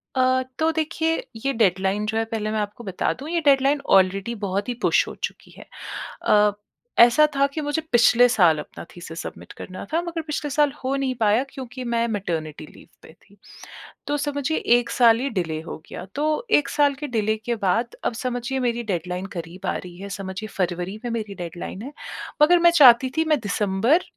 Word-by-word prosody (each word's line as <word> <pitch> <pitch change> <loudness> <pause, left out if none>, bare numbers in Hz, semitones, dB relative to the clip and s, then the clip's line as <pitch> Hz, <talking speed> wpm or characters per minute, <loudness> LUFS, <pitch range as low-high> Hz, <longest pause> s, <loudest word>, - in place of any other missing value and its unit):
अ, 255 0 +3 0.2
तो 320 +1 +2
देखिए 320 +1 -1 0.2
ये 275 - +1
डेडलाइन 195 -2 +1
जो 220 +1 -2
है 225 - +1
पहले 220 -1 -3
मैं 215 - -1
आपको 210 +3 -5
बता 190 -4 -1
दूँ 285 +4 -7
ये 340 0 0
डेडलाइन 280 +1 +4 0.2
ऑलरेडी 195 +5 -1
बहुत 200 +4 -2
ही - - 0
पुश - - +3
हो - - -7
चुकी - - -5
है। - - -12 0.6
अ, 210 0 +5 0.5
ऐसा 240 +6 +7
था 275 0 +4
कि 310 - -3
मुझे 290 +2 -1
पिछले 240 +1 +6
साल 175 -9 +4
अपना 150 - -9
थीसिस 165 -2 -7
सबमिट - - -9
करना 185 -1 -7
था 330 - +2
मगर 340 -1 -4
पिछले 300 -1 -3
साल 295 0 +3
हो 265 +1 0
नहीं 270 -1 -1
पाया 215 +3 +3
क्योंकि 260 -2 -8
मैं 235 -1 0
मैटरनिटी 165 -8 -4
लीव - - -16 0.2
पे - - -14
थी 200 - -23 0.7
तो 290 - 0
समझिए 290 +1 -1 0.2
1 245 - -3
साल 230 -2 +5
ही 275 +2 -1
डिले 165 -7 -2
हो 160 - -7
गया। - - -7
तो 290 +2 0 0.3
1 290 - -6
साल 290 -1 +3
के 295 - -3
डिले 215 0 +1
के 235 +2 -3
बाद 230 +6 0
अब - - 0
समझिए 250 +1 -2
मेरी 240 -1 -1
डेडलाइन 180 -2 -3
करीब 170 +2 -7
आ - - 0
रही 175 -1 -10
है। 200 +2 -8
समझिए 195 +1 -6
फ़रवरी 180 +2 -2
में 240 - -2
मेरी 215 -3 -4
डेडलाइन 175 +3 -7
है 280 +4 -8 0.5
मगर 350 +3 +6
मैं 345 0 +6
चाहती 255 0 +8
थी 320 - +2
मैं 300 - +2
दिसंबर 210 - +1
235 Hz, 200 wpm, -23 LUFS, 195-275 Hz, 0.7 s, चाहती